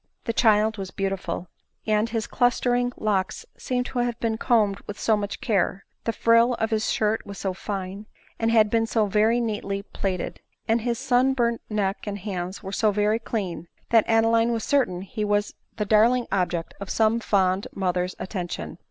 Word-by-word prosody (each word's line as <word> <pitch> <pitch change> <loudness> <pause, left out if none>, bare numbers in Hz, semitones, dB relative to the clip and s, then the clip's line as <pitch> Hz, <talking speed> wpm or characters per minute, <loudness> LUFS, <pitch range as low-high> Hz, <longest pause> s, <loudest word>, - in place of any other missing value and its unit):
The 230 - -1
child 220 -2 +3
was 190 -1 -4
beautiful; 195 -3 -3 0.4
and 215 +1 +2
his 225 -1 -2
clustering 245 0 +1
locks 200 -3 -1
seemed 250 -1 -2
to 250 - -3
have 240 -1 -1
been 225 -1 0
combed 210 -5 +2
with 205 - -7
so 220 - +3
much 205 -1 -4
care; 195 -3 0 0.2
the 230 - +1
frill 230 +2 +4
of 220 0 -2
his 220 0 0
shirt 215 0 +1
was 200 -1 -9
so 190 -2 -2
fine, 195 +1 -5 0.3
and 225 - +1
had 220 -2 +4
been 225 -1 +2
so 225 -1 +2
very 215 +4 +3
neatly 205 -3 -2
plaited; 190 -3 -3 0.3
and 225 +1 +2
his 235 0 -1
sun 260 +1 +2
burnt 235 -2 +1
neck 200 -1 -1
and 200 0 -3
hands 185 -1 -5
were 195 - -5
so 215 +2 +2
very 205 +1 0
very 215 +2 +2
clean, 190 -7 -4 0.2
that 225 -2 +5
Adeline 225 +1 +3
was 230 -1 -1
certain 215 -11 +1
he 210 +2 -4
was 205 0 0 0.2
the 210 - -1
darling 230 +4 +4
object 180 -3 -1
of 200 -1 -7
some 225 +1 +2
fond 190 -3 +1
mother's 180 -1 -1
attention. 175 - -5
215 Hz, 185 wpm, -25 LUFS, 195-230 Hz, 0.4 s, that